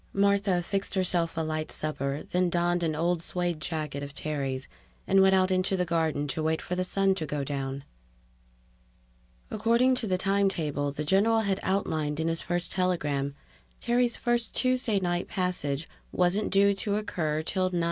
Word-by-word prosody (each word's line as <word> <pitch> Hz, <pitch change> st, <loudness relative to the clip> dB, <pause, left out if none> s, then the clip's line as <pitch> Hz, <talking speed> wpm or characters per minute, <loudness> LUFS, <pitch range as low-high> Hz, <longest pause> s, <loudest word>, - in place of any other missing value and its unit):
Martha 200 Hz, -2 st, +2 dB
fixed 195 Hz, +2 st, -3 dB
herself 175 Hz, -3 st, +1 dB
a -, -, +1 dB
light 155 Hz, 0 st, -3 dB
supper, 140 Hz, -2 st, -3 dB
then 180 Hz, 0 st, +2 dB
donned 175 Hz, 0 st, +1 dB
an 160 Hz, -2 st, 0 dB
old 170 Hz, +2 st, 0 dB
suede 175 Hz, -2 st, -2 dB
jacket 155 Hz, -3 st, -3 dB
of 140 Hz, 0 st, -7 dB
Terry's 135 Hz, -3 st, -3 dB, 0.4 s
and 195 Hz, -, +4 dB
went 190 Hz, 0 st, +5 dB
out 185 Hz, 0 st, +3 dB
into 185 Hz, +1 st, +1 dB
the 180 Hz, -, +1 dB
garden 160 Hz, -4 st, 0 dB
to 135 Hz, -, -2 dB
wait 160 Hz, +1 st, +1 dB
for -, -, -5 dB
the 180 Hz, 0 st, 0 dB
sun 195 Hz, +1 st, +2 dB
to 160 Hz, -5 st, -4 dB
go 145 Hz, -1 st, -2 dB
down. 135 Hz, -1 st, -4 dB, 1.7 s
According 235 Hz, +4 st, +3 dB
to 225 Hz, -, -3 dB
the 185 Hz, -2 st, +1 dB
time 195 Hz, +1 st, +2 dB
table 145 Hz, -5 st, -2 dB
the 145 Hz, +2 st, -4 dB
general 205 Hz, +7 st, +3 dB
had 200 Hz, -2 st, 0 dB
outlined 155 Hz, -6 st, -1 dB
in 160 Hz, +1 st, 0 dB
his 165 Hz, 0 st, 0 dB
first 175 Hz, 0 st, -1 dB
telegram, 150 Hz, -7 st, 0 dB, 0.4 s
Terry's 240 Hz, 0 st, +1 dB
first 240 Hz, -1 st, -1 dB
Tuesday 255 Hz, -5 st, +2 dB
night 175 Hz, -1 st, -1 dB
passage 165 Hz, -5 st, -2 dB, 0.2 s
wasn't 180 Hz, +4 st, +1 dB
due 200 Hz, +1 st, +4 dB
to 200 Hz, +1 st, -2 dB
occur 160 Hz, -7 st, -1 dB
till 185 Hz, +2 st, 0 dB
9:05. 180 Hz, -1 st, -1 dB
175 Hz, 175 wpm, -28 LUFS, 155-195 Hz, 1.7 s, went